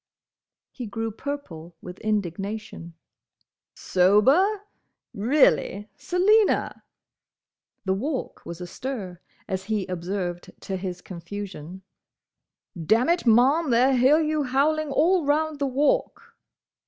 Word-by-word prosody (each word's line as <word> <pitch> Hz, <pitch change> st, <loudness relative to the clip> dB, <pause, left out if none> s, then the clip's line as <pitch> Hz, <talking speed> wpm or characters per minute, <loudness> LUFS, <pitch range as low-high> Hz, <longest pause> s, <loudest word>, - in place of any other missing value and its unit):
He 245 Hz, -4 st, -7 dB
grew 225 Hz, +2 st, -4 dB
purple 200 Hz, -, -7 dB
with 180 Hz, +2 st, -10 dB
indignation. 200 Hz, -3 st, -4 dB, 0.8 s
"Sober!—Reely, 250 Hz, -, +1 dB
Selina!—" 405 Hz, +4 st, +2 dB, 1.0 s
The 190 Hz, -, +1 dB
Walk 260 Hz, +8 st, -4 dB
was 170 Hz, 0 st, -8 dB
astir, 185 Hz, -1 st, -6 dB, 0.3 s
as 190 Hz, -2 st, -4 dB
he 210 Hz, -2 st, -1 dB
observed 180 Hz, 0 st, -4 dB
to 195 Hz, -, -4 dB
his 180 Hz, -1 st, -5 dB
confusion. 185 Hz, -1 st, -8 dB, 0.9 s
"Dammit, 230 Hz, -, +1 dB
Ma'am, 265 Hz, +8 st, +4 dB
they'll 250 Hz, +3 st, +4 dB
hear 265 Hz, +5 st, +5 dB
you 310 Hz, -1 st, 0 dB
howling 290 Hz, +3 st, +1 dB
all 330 Hz, +5 st, +2 dB
round 300 Hz, +1 st, 0 dB
the 280 Hz, -, 0 dB
Walk!" 290 Hz, -, 0 dB
225 Hz, 95 wpm, -25 LUFS, 190-290 Hz, 1.0 s, hear